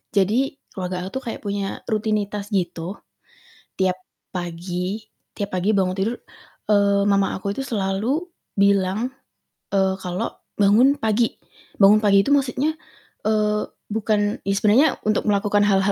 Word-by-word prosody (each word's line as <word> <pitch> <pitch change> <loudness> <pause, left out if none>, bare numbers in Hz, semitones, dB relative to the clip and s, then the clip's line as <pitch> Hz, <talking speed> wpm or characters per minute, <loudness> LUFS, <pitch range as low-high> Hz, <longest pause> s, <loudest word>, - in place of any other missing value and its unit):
jadi 200 +5 +3 0.3
keluarga 180 -1 -4
aku - - -5
tuh - - -17
kayak - - -6
punya 200 -1 -3
rutinitas 210 -1 -1
gitu. 175 0 -2 0.8
Tiap 185 -1 +1 0.3
pagi 180 +3 -4 0.3
tiap 205 -1 -4
pagi 200 +4 +1
bangun 185 -2 +2
tidur, 220 +5 0 0.6
eee, 200 -1 +4
mama 200 -1 +2
aku 200 +1 -3
itu 270 - -4
selalu 220 - -1 0.3
bilang, 200 +4 +2 0.6
eee, 190 -1 +2
kalo 180 -1 -4 0.2
bangun 225 +8 +5
pagi. 220 +1 +1 0.5
Bangun 200 +2 +8
pagi 200 -1 +6
itu - - -3
maksudnya, 280 +3 0 0.5
eee, 210 -1 +2 0.3
bukan 210 -1 0
ya 195 - +2
sebenernya 215 +9 +5 0.2
untuk 215 +1 +1
melakukan 205 0 +2
hal-hal 195 0 +3
200 Hz, 130 wpm, -22 LUFS, 190-215 Hz, 0.8 s, Bangun